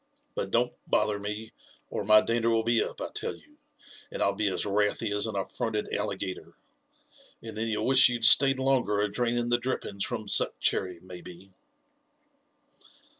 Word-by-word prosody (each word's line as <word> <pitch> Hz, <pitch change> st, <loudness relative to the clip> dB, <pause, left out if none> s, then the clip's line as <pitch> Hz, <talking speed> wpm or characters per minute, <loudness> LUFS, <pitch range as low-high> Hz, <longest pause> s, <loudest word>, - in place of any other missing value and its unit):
But -, -, -3 dB
don*t -, -, +1 dB, 0.2 s
boliier 105 Hz, -1 st, +1 dB
me, 105 Hz, +2 st, -5 dB, 0.4 s
or -, -, -3 dB
my 110 Hz, +1 st, +6 dB
dander 115 Hz, 0 st, 0 dB
will 115 Hz, -1 st, +2 dB
be 115 Hz, 0 st, +2 dB
up, -, -, -7 dB
I -, -, -4 dB
tell -, -, -4 dB
you, -, -, -22 dB, 0.5 s
and -, -, -2 dB
I'll 100 Hz, -, +2 dB
be 105 Hz, +1 st, -1 dB
as 95 Hz, -, -1 dB
wrathy 105 Hz, +2 st, 0 dB
as 105 Hz, +2 st, +1 dB
an 110 Hz, -, -5 dB
atTronted 105 Hz, +2 st, -3 dB
alligator; 95 Hz, -, -4 dB, 0.9 s
and 115 Hz, -1 st, -8 dB
then 110 Hz, +1 st, -2 dB
you'll 110 Hz, -1 st, -1 dB
wish 130 Hz, 0 st, +6 dB
you'd 120 Hz, -2 st, 0 dB
stayed 135 Hz, +3 st, +7 dB
longer 130 Hz, -6 st, +1 dB
a 105 Hz, -1 st, -1 dB
draining 120 Hz, +1 st, -1 dB
the 120 Hz, 0 st, +2 dB
drippings 120 Hz, -5 st, -3 dB
from 110 Hz, -4 st, -4 dB
Suc -, -, +1 dB
chcrry, 90 Hz, -3 st, 0 dB
maybe." 90 Hz, +1 st, -12 dB
110 Hz, 170 wpm, -28 LUFS, 100-120 Hz, 0.9 s, stayed